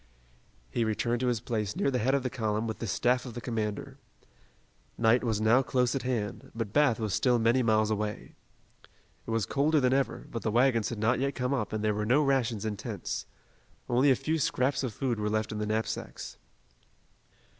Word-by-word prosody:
He 120 Hz, -, 0 dB
returned 115 Hz, +2 st, 0 dB
to 130 Hz, -, 0 dB
his 120 Hz, -3 st, +1 dB
place 110 Hz, -4 st, -2 dB
near 140 Hz, -, +1 dB
the 125 Hz, -, 0 dB
head 130 Hz, +5 st, +2 dB
of 140 Hz, -, 0 dB
the 130 Hz, -, -1 dB
column 110 Hz, -3 st, -1 dB
with 110 Hz, -1 st, -4 dB
the 115 Hz, -, -3 dB
staff 125 Hz, +5 st, +1 dB
of 125 Hz, -3 st, -8 dB
the -, -, -4 dB
commander. 110 Hz, -4 st, -4 dB, 1.0 s
Night 115 Hz, +2 st, +3 dB
was 110 Hz, -3 st, 0 dB
now 110 Hz, +4 st, +4 dB
close 125 Hz, -2 st, +1 dB
at 135 Hz, -, -1 dB
hand, 115 Hz, -6 st, -3 dB
but 115 Hz, -3 st, -4 dB
Bath 145 Hz, -6 st, +3 dB
was 110 Hz, -4 st, -2 dB
still 125 Hz, +4 st, +3 dB
many 115 Hz, +3 st, +3 dB
miles 110 Hz, -2 st, +2 dB
away. 105 Hz, -1 st, -3 dB, 0.9 s
It -, -, -6 dB
was 115 Hz, -3 st, 0 dB
colder 150 Hz, +3 st, +2 dB
than 130 Hz, -1 st, +2 dB
ever, 135 Hz, 0 st, 0 dB
but 115 Hz, -, -4 dB
the 110 Hz, -, -1 dB
wagons 115 Hz, -1 st, +3 dB
had 120 Hz, -, -5 dB
not 110 Hz, +4 st, +1 dB
yet 140 Hz, +1 st, -1 dB
come 125 Hz, +1 st, -1 dB
up 115 Hz, -7 st, -1 dB
and 110 Hz, 0 st, -2 dB
there 105 Hz, 0 st, +2 dB
were 105 Hz, 0 st, -2 dB
no 140 Hz, +6 st, +4 dB
rations 125 Hz, -6 st, +1 dB
and 105 Hz, -2 st, -3 dB
tents. -, -, -4 dB, 0.6 s
Only 125 Hz, +4 st, +3 dB
a 130 Hz, -, +6 dB
few 160 Hz, +5 st, -1 dB
scraps 130 Hz, -1 st, +1 dB
of 130 Hz, -4 st, -2 dB
food 120 Hz, +1 st, -2 dB
were 105 Hz, 0 st, -1 dB
left 110 Hz, 0 st, -1 dB
in 105 Hz, -, -4 dB
the 105 Hz, -, -2 dB
knapsacks. 110 Hz, +1 st, -4 dB
115 Hz, 210 wpm, -29 LUFS, 110-130 Hz, 1.0 s, a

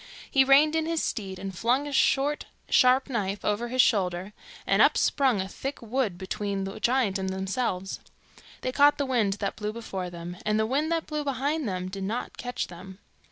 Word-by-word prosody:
He 270 Hz, -2 st, +5 dB
reined 285 Hz, +4 st, +5 dB
in 320 Hz, 0 st, 0 dB
his 330 Hz, -1 st, 0 dB
steed, 195 Hz, -4 st, -3 dB
and 190 Hz, 0 st, -6 dB
flung 250 Hz, +9 st, +1 dB
a -, -, -5 dB
short, 280 Hz, +1 st, +2 dB, 0.2 s
sharp 255 Hz, +1 st, +5 dB
knife 205 Hz, -6 st, -2 dB
over 210 Hz, +3 st, 0 dB
his 255 Hz, +1 st, +4 dB
shoulder, 185 Hz, -2 st, 0 dB, 0.3 s
and -, -, +3 dB
up -, -, +5 dB
sprung 265 Hz, -7 st, +2 dB
a 190 Hz, -, -2 dB
thick 270 Hz, +8 st, -5 dB
wood 230 Hz, -5 st, -1 dB
between 195 Hz, +1 st, -3 dB
the 195 Hz, +2 st, -6 dB
giant 235 Hz, -5 st, +1 dB
and 190 Hz, 0 st, -2 dB
themselves. 190 Hz, 0 st, -2 dB, 0.6 s
They 255 Hz, -, -2 dB
caught 285 Hz, +2 st, +5 dB
the 285 Hz, -, 0 dB
wind 235 Hz, -7 st, +1 dB
that 200 Hz, 0 st, -3 dB
blew 210 Hz, -1 st, -3 dB
before 195 Hz, -5 st, -5 dB
them, 175 Hz, 0 st, -8 dB
and 215 Hz, 0 st, +1 dB
the 220 Hz, -, +2 dB
wind 290 Hz, +7 st, 0 dB
that 330 Hz, -1 st, 0 dB
blew 300 Hz, -1 st, -3 dB
behind 285 Hz, 0 st, -1 dB
them 185 Hz, -1 st, -3 dB
did 195 Hz, +1 st, -6 dB
not 220 Hz, +6 st, -3 dB
catch 245 Hz, 0 st, -3 dB
them. 185 Hz, +2 st, -11 dB
220 Hz, 200 wpm, -27 LUFS, 190-270 Hz, 0.6 s, He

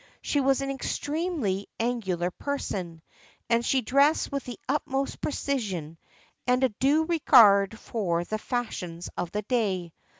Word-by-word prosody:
She 290 Hz, -, +1 dB
was 270 Hz, 0 st, +2 dB
an 275 Hz, 0 st, -2 dB
extremely 285 Hz, -, -2 dB
angular 190 Hz, -7 st, -1 dB
person, 180 Hz, -, -4 dB, 0.5 s
and 230 Hz, 0 st, +3 dB
she 265 Hz, +2 st, +2 dB
dressed 280 Hz, +8 st, +3 dB
with 280 Hz, -2 st, -3 dB
the 245 Hz, -, -7 dB
utmost 275 Hz, -1 st, -1 dB
precision 190 Hz, -, -3 dB, 0.5 s
and 250 Hz, +1 st, +3 dB
a 260 Hz, -, +4 dB
due 275 Hz, +8 st, +2 dB
regard 225 Hz, -, +5 dB
for 175 Hz, -8 st, -1 dB
the 215 Hz, +4 st, -4 dB
fashions 180 Hz, -9 st, -4 dB
of 175 Hz, -, -3 dB
the 210 Hz, +3 st, -3 dB
day. 195 Hz, -8 st, -1 dB
235 Hz, 135 wpm, -27 LUFS, 190-275 Hz, 0.5 s, regard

